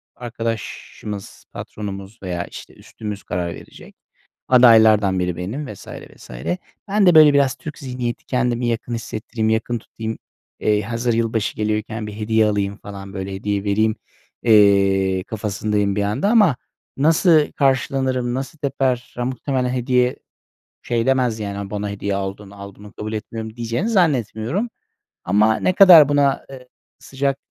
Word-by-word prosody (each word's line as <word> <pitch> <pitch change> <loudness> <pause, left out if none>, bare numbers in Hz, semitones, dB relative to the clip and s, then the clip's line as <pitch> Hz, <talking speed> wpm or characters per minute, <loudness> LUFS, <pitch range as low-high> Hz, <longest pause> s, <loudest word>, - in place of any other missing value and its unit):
arkadaşımız, 115 -3 -6
patronumuz 100 +1 -7
veya, 90 -2 -3
işte, - - -11
üstümüz 105 -2 -8
karar 90 -1 -3
verecek. - - -14 0.5
Adaylardan 110 -6 +6
biri 90 -1 -1
benim 120 +11 -5
vs. 100 - -14
vs. - - -11 0.6
Ben 200 0 +2
de, 175 - +5
böyle, 155 -2 +8
biraz 140 -2 +3
Türk 155 - -9
zihniyeti, 125 -4 -4
kendimi 125 -1 0
yakın 120 +1 -2
hissettireyim, 110 0 -3
yakın 110 +2 0
tutayım. 110 0 -6 0.4
Eee, 105 -1 +2
hazır 115 +3 -1
yılbaşı 115 -2 -1
geliyorken 110 0 -2
bir 105 - -7
hediye 110 +1 +1
alayım 100 -1 -1
falan, 100 -1 -10
böyle, 95 0 -5
hediye 100 +1 -2
vereyim, 110 +2 +1 0.5
eee, 100 -3 +4
kafasındayım 105 -1 -2
bir 105 - 0
yanda 105 - 0
ama 205 - +5 0.4
nasıl 155 +1 +4
karşılanırım, 130 -2 0
nasıl 135 +5 -5
teper? 130 -3 -1
Ya, 120 - -1
muhtemelen 130 0 -2
hediye 125 0 +1 0.7
şey 115 0 -1
demez 125 -4 +1
yani, 100 -1 -4
“A, 100 -1 -6
bana 105 0 -3
hediye 100 0 -3
aldın, 100 +1 -5
al 100 -1 -10
bunu, 105 0 -14
kabul 110 +1 -6
etmiyorum,” 110 +1 -6
diyeceğini 120 - -2
zannetmiyorum. 160 - 0 0.5
Ama 105 +4 +3
ne 185 - +1
kadar 175 -7 +8
buna, 145 -1 +2
eee, 130 -2 -11 0.3
sıcak 135 0 -2
110 Hz, 140 wpm, -20 LUFS, 105-130 Hz, 0.7 s, böyle